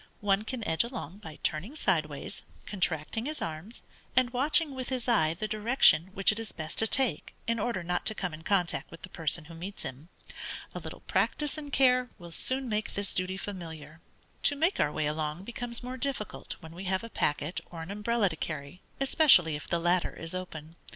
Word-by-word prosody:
One 200 0 +3
can 235 -2 -4
edge 160 - +4
along 220 - -6
by 160 -7 -9
turning 185 - 0
sideways, 155 - -1 0.2
contracting 185 - -1
his 305 0 -3
arms, 165 +8 -6 0.3
and 250 -1 +4
watching 290 +4 +3
with 260 -1 -4
his 255 -2 -2
eye 165 -10 +3
the 215 +5 -3
direction 210 - +5
which 195 +1 +5
it 210 - -3
is 225 -2 -5
best 155 -1 -3
to 225 - +5
take 265 +2 +3
in 230 0 0
order 205 -4 -1
not 175 +1 -1
to 220 - +2
come 180 -5 -3
in 155 - -8
contact 170 -6 +1
with 165 - -12
the 185 - -3
person 160 -1 0
who 165 - -11
meets 180 +5 -7
him. 135 +6 -7 0.6
A - - -4
little - - -8
practice 295 -2 0
and 295 -2 -6
care 255 -2 +4
will 175 -3 -10
soon 260 +9 +1
make 215 -1 -1
this 200 0 -1
duty 185 +1 -1
familiar. 165 -5 -7 0.4
To 285 - +4
make 325 +7 +1
our 150 - +3
way 155 - -1
along, 155 +3 -2
becomes 240 +2 -4
more 255 +1 -5
difficult 260 -5 -3
when 160 0 -10
we 185 +3 -7
have 190 +2 0
a 230 - -6
packet 145 +3 0
or 165 -2 -7
an 170 - -7
umbrella 210 +1 +1
to 160 - -5
carry, 155 +2 -5 0.2
especially 270 - +6
if 150 - -7
the 170 - +1
latter 175 +1 +1
is 165 +1 -3
open. 165 -3 -6
190 Hz, 205 wpm, -30 LUFS, 160-235 Hz, 0.6 s, especially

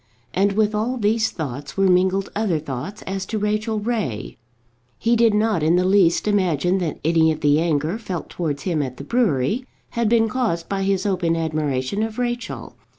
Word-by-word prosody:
And 200 +2 +2
with 215 +1 +2
all 225 +5 -1
these 220 0 +2
thoughts 140 -3 -6
were 195 - +3
mingled 190 +1 +2
other 205 -6 +1
thoughts 150 +6 -6
as 195 0 -3
to 220 - -2
Rachel 215 +1 -1
Ray. 210 - -3 0.6
He 235 +1 +2
did 230 -2 +4
not 215 -4 +2
in 160 +3 +3
the 180 +1 +2
least 190 -1 +3
imagine 185 -3 +2
that 170 -4 -2
any 160 0 +4
of 155 - -4
the 145 0 +4
anger 160 +4 0
felt 185 -7 -5
towards 150 -5 -3
him 170 -5 0
at 130 -3 -4
the - - -7
brewery 205 - +1 0.3
had 235 -2 0
been 225 -1 +4
caused 215 -8 -1
by 195 -1 -2
his 195 0 0
open 180 -4 +1
admiration 155 +1 -1
of 220 0 -3
Rachel. 240 -1 -4
190 Hz, 185 wpm, -22 LUFS, 160-215 Hz, 0.6 s, did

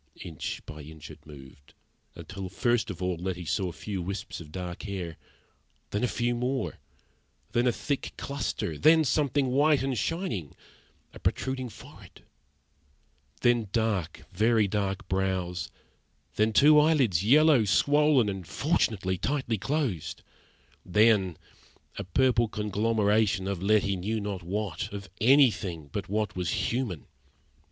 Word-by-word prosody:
Inch 80 -3 -6
by 75 0 -9
inch 80 0 -11
it - - -15
moved, 70 -2 -14 0.4
until 95 -1 -7
first 120 +4 0
of 95 -2 -5
all 90 -2 -1
Letty 90 0 -4
saw 95 +4 -1
a - - -6
few 95 +2 -5
wisps 95 +1 -5
of 75 -2 -12
dark 90 0 -6
hair, 95 -6 -5 0.8
then 105 - -1
a - - +3
few 120 0 -1
more, 125 - -2 0.7
then 120 +1 +2
a - - +4
thick 140 +4 -3
cluster; 135 - -3
then 160 0 +6
something 140 0 +1
white 145 +2 +3
and 135 -1 -1
shining 115 - -3 0.6
a - - -11
protruding 130 -1 -2
forehead; - - -15 1.2
then 120 -3 +3
dark, 105 -7 -1
very 110 +2 +3
dark 100 0 -2
brows; 95 -2 -1 0.7
then 110 +1 +2
two 150 +7 +6
eyelids, 135 - +3
yellow, 145 +2 +5
swollen, 145 +4 +3
and 95 -4 -4
fortunately 100 - 0
tightly 130 -5 -1
closed; 130 - -2 0.6
then 95 -3 +3 0.6
a - - -3
purple 120 +3 +2
conglomeration 105 -1 +1
of 100 -3 -3
Letty 100 0 +2
knew 105 +5 -2
not 100 -2 -4
what 95 -1 -3
of 100 -2 -8
anything 110 - +3
but - - -4
what 105 -1 -1
was 90 -1 -2
human. 110 - -2
105 Hz, 135 wpm, -28 LUFS, 90-125 Hz, 1.2 s, then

